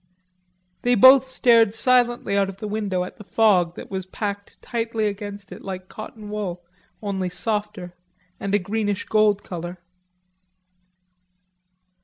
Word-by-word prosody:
They 245 0 +3
both 260 +4 +8
stared 230 -4 +4
silently 240 -3 +2
out 200 -1 +2
of 195 - -9
the 210 - -5
window 205 -4 -1
at 180 - -9
the - - -11
fog 190 -6 +3
that - - -10
was 190 -1 -4
packed 200 0 -5
tightly 225 -2 -2
against 205 -1 -5
it - - -9
like 185 -1 -7
cotton 215 -1 -9
wool, 185 -4 -4 0.4
only 190 -3 -2
softer, 210 -2 -3 0.5
and 200 0 -1
a - - +6
greenish 205 +1 -2
gold 210 -2 +2
color. 175 0 -6
205 Hz, 135 wpm, -23 LUFS, 190-220 Hz, 0.5 s, both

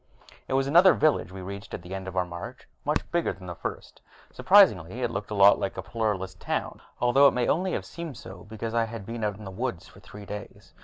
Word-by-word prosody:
It - - -3
was 135 0 +2
another 175 +7 +6
village 155 -10 +2
we 95 0 -8
reached 100 +1 -7
at - - -9
the 90 +2 -8
end 95 0 -5
of 95 0 -6
our 90 - +2
march, 85 0 -9 0.2
much - - +1
bigger 170 0 0
than 95 - -13
the 90 - -5
first. 80 - -7 0.3
Surprisingly, 125 - +4
it 120 - 0
looked 100 -1 -4
a 105 - -3
lot 100 0 +6
like 95 - -3
a - - -4
Pluralist 95 -5 -2
town, - - -3 0.2
although 130 +3 +5
it 135 - +2
may 125 -1 +1
only 185 +3 +1
have - - -3
seemed 165 -7 -7
so 95 -1 -11
because 110 +1 -6
I 115 -1 +2
had 110 -3 -8
been 115 +1 -5
out 105 -2 -1
in 105 - -11
the 95 - -7
woodlands 105 -3 -4
for - - -16
three 100 +1 -12
days. 105 0 -9
105 Hz, 245 wpm, -27 LUFS, 95-125 Hz, 0.3 s, another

